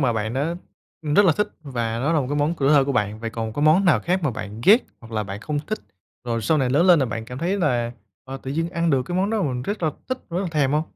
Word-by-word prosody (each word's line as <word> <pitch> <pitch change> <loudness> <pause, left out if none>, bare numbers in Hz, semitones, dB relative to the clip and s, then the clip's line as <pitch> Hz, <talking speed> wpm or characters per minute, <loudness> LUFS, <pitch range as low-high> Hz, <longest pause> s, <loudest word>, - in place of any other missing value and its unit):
mà 125 -4 +2
bạn 110 0 -2
đã, 150 +5 -1 0.5
ừm, 150 -1 -1
rất 205 - +6
là 170 - +5
thích 210 - 0
và 115 -5 -3
nó 145 +7 0
là 155 - +3
một 130 - -2
cái 145 - -1
món 145 +3 +1
tuổi 135 - +2
thơ 145 -2 +5
của 140 - -1
bạn. 105 -3 -1
Vậy 115 -1 -4
còn 110 -1 -4
có 145 - -2
món 160 +6 +5
nào 150 -11 +4
khác 180 - 0
mà 150 - +1
bạn 110 0 -7
ghét, 220 +6 +6 0.2
hoặc 115 -1 -13
là 110 - 0
bạn 100 +1 -7
không 150 +5 -2
thích, 215 - -2 0.5
rồi 115 -2 -2
sau 155 +8 +2
này 130 -3 +1
lớn 165 +7 +3
lên 175 -3 +7
là 135 - +1
bạn 110 -1 -4
cảm 125 +2 -8
thấy 185 +5 -1
là, 120 -8 0 0.3
à, 135 +1 -6
tự 130 - -5
nhiên 165 +4 -1
ăn 170 -2 0
được 135 -2 +2
cái 175 +7 -4
món 195 +3 +1
đó 220 -3 0
mà 145 - +1
mình 125 -1 -3
rất 205 +4 -4
là 155 - +2 0.2
thích, 255 0 -2
rất 170 - -1
là 190 - -2
thèm 145 -4 +1
hông? 150 +1 +2
145 Hz, 320 wpm, -23 LUFS, 120-170 Hz, 0.5 s, lên